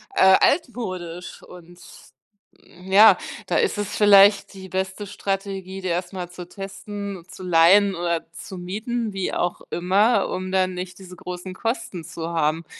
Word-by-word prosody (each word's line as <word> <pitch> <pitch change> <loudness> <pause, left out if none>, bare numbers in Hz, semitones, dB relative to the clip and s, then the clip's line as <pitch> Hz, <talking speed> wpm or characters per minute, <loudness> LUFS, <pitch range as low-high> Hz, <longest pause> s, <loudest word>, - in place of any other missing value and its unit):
äh, 190 0 +7
altmodisch 185 - -2
und, 175 0 -14 0.8
hm, 180 +2 -14
ja, 210 +3 +8 0.3
da - - -1
ist 445 - +1
es 205 -1 -3
vielleicht 200 -1 +6
die 190 -1 -10
beste 190 +2 -4
Strategie, 195 -1 -4
die 185 - -4
erst 175 +1 -2
mal 180 -3 -6
zu 180 0 -10
testen, 200 -1 -7
zu 185 - -11
leihen 185 +3 +5
oder 170 -1 -2
zu 190 - -9
mieten, 215 +5 -4
wie 195 -1 -2
auch 175 0 -2
immer, 195 +7 +2
um 185 0 -4
dann 185 -1 +1
nicht 180 +1 -7
diese 185 -1 -11
großen 180 +1 -7
Kosten 225 -5 -4
zu 165 +1 -7
haben. 160 0 0
190 Hz, 155 wpm, -23 LUFS, 175-200 Hz, 0.8 s, ja